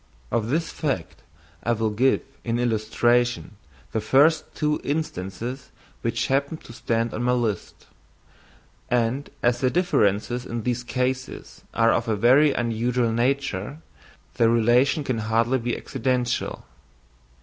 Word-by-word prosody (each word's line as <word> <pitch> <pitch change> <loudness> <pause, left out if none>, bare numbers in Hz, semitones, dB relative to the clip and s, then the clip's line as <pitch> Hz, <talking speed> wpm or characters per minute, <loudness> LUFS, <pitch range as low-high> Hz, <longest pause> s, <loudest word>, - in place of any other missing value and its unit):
Of 110 -2 0
this 160 +4 0
fact 135 - -3 0.4
I 120 - +1
will 110 -1 0
give 130 +6 +2 0.2
in 115 0 -1
illustration 120 0 +1 0.4
the 110 - -1
first 145 +8 +4
two 150 0 0
instances 130 - -4 0.3
which 115 0 -1
happen 140 +3 0
to 115 - -13
stand 115 0 -1
on 110 - -3
my 125 0 +2
list; 115 -6 -2 1.0
and 125 +3 0
as 120 0 +2
the 130 - +3
differences 120 - +1
in 115 -2 -5
these 125 0 -1
cases 130 +1 -3
are 115 0 +4
of 115 - -1
a 110 - +1
very 130 +8 +5
unusual 120 0 0
nature, 125 0 -1 0.6
the 115 -1 +4
relation 120 +6 +3
can 130 -4 -2
hardly 115 +4 +1
be 120 0 -2
accidental. 125 -2 -2
120 Hz, 130 wpm, -24 LUFS, 115-130 Hz, 1.0 s, very